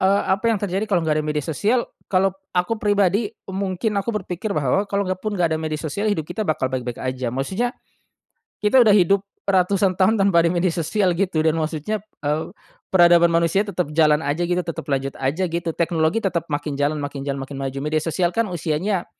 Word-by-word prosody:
eee, 195 +1 +3
apa 190 +4 +1
yang 225 - +2
terjadi 195 +1 -1
kalo 180 -5 +1
enggak 155 -1 +1
ada - - -5
media 150 -1 -2
sosial? 215 - +1 0.2
Kalo 190 0 +2 0.2
aku 195 +5 0
pribadi, 205 +1 +2 0.2
mungkin 190 +2 -2
aku 195 - -9
berpikir 185 +2 -4
bahwa 150 +8 +1
kalo 200 0 0
enggak 185 0 -3
pun 215 0 -3
enggak 170 -3 +1
ada 160 - -1
media 155 -1 -2
sosial 165 +8 -2
hidup 165 -7 0
kita 180 +6 -4
bakal 130 -4 0
baik-baik 125 -2 -3
aja. 130 -1 -3
Maksudnya, 190 - -2 0.8
kita 230 +5 +5
udah 220 - +5
hidup 195 -1 +4 0.2
ratusan 190 0 +2
tahun 200 +4 +3
tanpa 195 -4 +4
ada 170 - +2
media 175 0 +1
sosial 180 +3 +1
gitu 170 -4 0
dan 160 - +3
maksudnya, 160 +6 -2 0.2
eee, 150 +2 -1 0.4
peradaban 175 -2 +6
manusia 170 +3 +2
tetep 190 -5 -2
jalan 150 -2 +4
aja 150 +5 0
gitu 180 +1 0
tetep 170 -2 -5
lanjut 135 -1 -1
aja 145 +8 0
gitu 170 0 -2
teknologi 165 +3 +1
tetep 185 -6 -1
makin 145 0 -2
jalan, 145 +2 0
makin 145 -1 -5
jalan, 140 -1 -3
makin 140 - -9
maju, 135 0 -3
media 155 0 0
sosial 175 +2 0
kan 230 -3 0
usianya 175 +3 -1
175 Hz, 200 wpm, -22 LUFS, 155-195 Hz, 0.8 s, peradaban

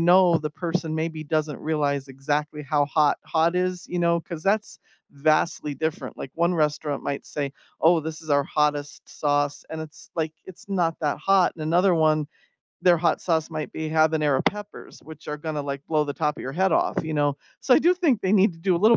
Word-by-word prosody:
know 175 0 +5
the 150 - -3
person 165 -1 -3
maybe 160 -1 -3
doesn't 155 -1 -1
realize 145 -3 -1
exactly 150 +3 -2
how 145 0 +1
hot, 150 0 +2
hot 165 +2 +2
is, 180 -1 -1
you 180 - -3
know, 170 0 +2
cause 165 -1 -8
that's 205 +2 0 0.3
vastly 150 0 +1
different. 160 +2 -3
Like, 130 - -7
one 170 +2 +1
restaurant 150 -2 -1
might 140 - -4
say, 140 -2 -4 0.3
"Oh, 165 +1 +5
this 160 +1 -6
is 155 - -9
our 140 -1 +3
hottest 145 -1 -1
sauce," 145 -1 -1
and 160 - -6
it's 155 -1 -13
like, 160 -1 -1
it's 185 +2 -13
not 175 -4 +1
that 150 -3 0
hot, 195 -2 +3
and 160 - -8
another 175 +4 +3
one, 155 -2 +2 0.5
their 175 -1 +5
hot 165 0 +1
sauce 160 -2 0
might 155 -1 -5
be 160 0 -4
habanero 155 -3 +2
peppers, 205 0 -4
which 160 -1 -12
are 150 - -3
gonna, 150 0 -4
like, 140 0 -5
blow 155 -2 +2
the 145 - -3
top 150 0 -1
of - - -8
your 135 - -5
head 190 +5 +2
off, - - +1
you 160 0 -4
know. 145 -1 +1 0.2
So, 260 - +4
I - - +6
do 345 +3 +5
think 315 - +2
they 190 -1 0
need 200 -1 +5
to 165 - -16
do 180 0 +2
a - - 0
little 225 +2 +7
160 Hz, 215 wpm, -24 LUFS, 150-175 Hz, 0.5 s, little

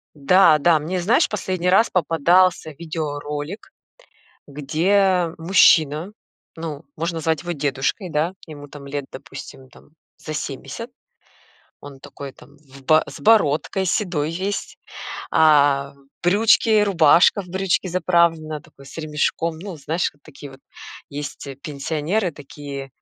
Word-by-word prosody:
Да, 155 +2 +5
да, 160 +2 +4
мне, 175 +5 -3
знаешь, 210 +8 +3
последний 185 -3 -2
раз 195 +5 +4
попадался 175 +1 +2
видеоролик, 150 +2 -6 0.7
где 175 +6 +1
мужчина, 165 -1 +3 0.4
ну, 160 -3 -6
можно 165 +1 -3
звать 160 -1 0
его 175 - -3
дедушкой, 145 - -2
да, 155 +5 -1
ему 145 -3 -10
там 140 -1 -11
лет, 140 0 -5
допустим, 130 -1 -11
там - - -20 0.3
за 155 - -7
семьдесят, 150 - -6 0.9
он 140 -1 -11
такой 140 +1 -9
там 145 - -19
в 135 -2 -17
бо 155 +3 +4
с - - -9
бородкой, 195 -3 +2
седой 175 -5 -1
весь. 190 +4 -4 0.5
А, 145 -3 +4 0.3
брючки, 215 +3 +4
рубашка 180 0 +4
в - - -15
брючки 190 +1 -1
заправлена, 170 -3 +1
такой 140 - -18
с 140 - -11
ремешком, 155 +1 -1
ну, 190 -2 -7
знаешь, 155 +4 -2
вот 145 - -32
такие 140 +1 -12
вот 135 0 -15 0.5
есть 145 0 -7 0.2
пенсионеры 160 +6 -2
такие, 140 -1 -9
160 Hz, 130 wpm, -21 LUFS, 145-180 Hz, 0.9 s, Да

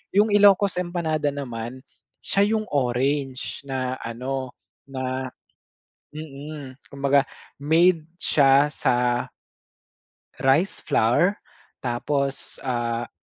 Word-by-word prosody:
'Yung 210 +1 +4
Ilocos 200 -2 +5
empanada 165 -4 -1
naman, 130 -2 -5 0.4
siya 200 +1 +2
'yung 215 - 0
orange 135 0 -1
na 130 -1 -2
ano 130 +2 -4 0.3
na 130 -1 -3 0.9
mm, 145 -2 -9
kumbaga 140 0 +3 0.3
made 160 +3 +3 0.2
siya 140 0 +4
sa 125 -4 +1 1.1
rice 140 +9 +2
flour 150 - +3 0.5
tapos, 135 +3 -2
ah, 120 -2 -2
140 Hz, 85 wpm, -24 LUFS, 130-155 Hz, 1.1 s, Ilocos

